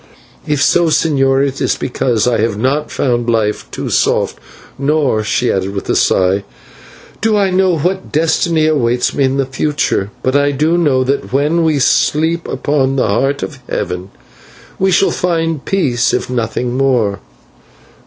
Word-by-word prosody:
"If 145 -1 +1
so, 175 +3 +3
señor, 140 -4 +2
it 135 0 -6
is - - +1
because 120 -3 -1
I 120 -2 +1
have 110 -1 0
not 135 +6 0
found 120 -3 -1
life 110 -2 -1
too - - -5
soft, - - +1 0.4
nor" 140 -6 +1
she 120 +3 0
added 95 +1 -2
with 100 - -5
a - - +1
sigh 95 +1 +2 0.8
"do 220 -1 +2
I 195 -2 +1
know 185 -2 +2
what 185 +5 -2
destiny 160 +1 +1
awaits 125 -6 +1
me 140 - +1
in 130 +1 0
the 135 - +1
future; 130 -6 -1
but 130 +1 0
I 145 0 +2
do 155 +5 +1
know 145 -7 +2
that 135 +2 -2
when 150 +5 +1
we 155 -2 +2
sleep 160 +5 +1
upon 135 0 0
the 130 - +1
Heart 135 +7 0
of 145 -4 -6
Heaven, 90 +1 -3 0.7
we 190 - +2
shall 190 +1 +3
find 165 -4 -1
peace 135 -10 +1
if 125 - -3
nothing 120 +1 -2
more." 125 -7 +1
135 Hz, 165 wpm, -15 LUFS, 120-160 Hz, 0.8 s, so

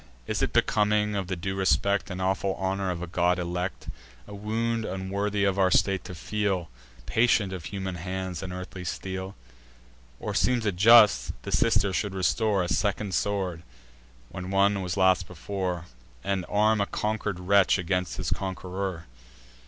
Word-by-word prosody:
Is - - -2
it - - +1
becoming 105 0 +2
of 95 -2 -2
the 95 - -2
due 95 +3 -3
respect 95 +2 +1
And 90 -1 -5
awful 95 +1 0
honour 95 0 -1
of 90 -1 -3
a - - -2
god 90 +1 +1
elect, 90 +1 -3 0.4
A 105 - -9
wound 115 +3 -1
unworthy 100 +1 -2
of 100 -1 +1
our 95 -1 +4
state 95 +1 +2
to 90 - -7
feel, 95 - -2 0.3
Patient 110 -3 +2
of 90 -3 -6
human 95 -2 -4
hands 90 0 -4
and 95 -2 -5
earthly 90 0 -7
steel? 95 +2 -5 0.8
Or - - -4
seems 125 -3 +1
it 100 -3 0
just, 105 +2 +6
the - - -5
sister 100 0 +2
should 100 +1 -1
restore 100 +1 +1
A - - -2
second 95 +3 -1
sword, 95 -2 -1 0.7
when 90 +5 -7
one 100 +1 +3
was 90 0 -3
lost 95 -2 +3
before, 90 -1 -4 0.4
And 95 -2 -1
arm 105 +1 +3
a 100 - 0
conquer'd 105 -3 -2
wretch 100 +2 +4
against 90 0 -1
his - - -3
conqueror? 95 -1 -3
95 Hz, 160 wpm, -27 LUFS, 90-100 Hz, 0.8 s, just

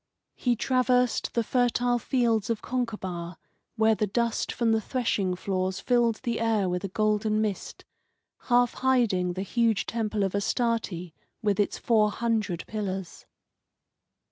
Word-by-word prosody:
He 245 -2 0
traversed 250 0 +1
the 235 - +2
fertile 245 0 +1
fields 230 -4 +1
of 230 -2 -2
Concabar, 190 -9 -4 0.4
where 220 -1 +4
the 210 0 0
dust 235 +2 -1
from 235 -2 +1
the 225 0 +2
threshing 205 -6 -1
floors 185 0 -2
filled 240 -3 +1
the 235 -3 -1
air 225 -4 +1
with 180 +1 -2
a - - -1
golden 215 +2 +1
mist, 210 -3 -3 0.6
half 245 -1 +3
hiding 230 -9 +1
the 190 +2 -3
huge 225 +1 +1
temple 215 -3 -1
of 195 - -1
Astarte 200 -4 -1 0.3
with 205 -2 +1
its 205 - +1
four 215 -3 +3
hundred 215 -5 -1
pillars. 190 -5 -5
220 Hz, 140 wpm, -27 LUFS, 195-235 Hz, 0.6 s, where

